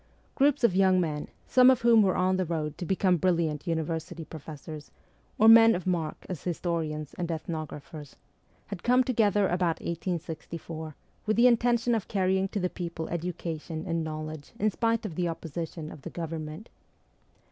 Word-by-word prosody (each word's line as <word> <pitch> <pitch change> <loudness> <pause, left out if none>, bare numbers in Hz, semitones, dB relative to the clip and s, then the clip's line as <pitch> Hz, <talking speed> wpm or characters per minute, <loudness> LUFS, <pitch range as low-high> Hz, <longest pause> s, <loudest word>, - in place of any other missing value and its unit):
Groups 280 -2 +2
of 200 -6 +4
young 190 -1 +4
men, 155 -4 -2 0.2
some 255 0 +6
of 260 -1 +4
whom 230 -2 +6
were 190 -3 +2
on 185 0 +2
the 185 - +1
road 155 -3 -3
to 175 - -4
become 185 -1 +2
brilliant 170 -3 0
university 165 0 -3
professors, 155 -1 -9 0.5
or 220 - +5
men 225 -1 +9
of 180 - -5
mark 170 -4 -2
as 180 -6 -6
historians 160 -4 -3
and 175 -1 -2
ethnographers, 155 -2 -6 0.5
had 195 -3 -7
come 250 +1 +4
together 210 -5 +2
about 175 -2 0
1864, 165 -2 -5 0.3
with 215 - +1
the 235 - +6
intention 240 0 +3
.of 220 -4 -1
carrying 190 -1 +1
to 200 - -3
the 180 - +1
people 170 -3 -5
education 165 -2 -4
and 165 -2 -1
knowledge 155 -1 -6
in 215 0 +1
spite 230 +1 0
of 195 - -4
the 175 +2 -1
opposi 165 -1 -4
tion 155 -2 -7
of 145 - -11
the - - -7
Government. 160 +3 -6
175 Hz, 170 wpm, -28 LUFS, 160-200 Hz, 0.5 s, men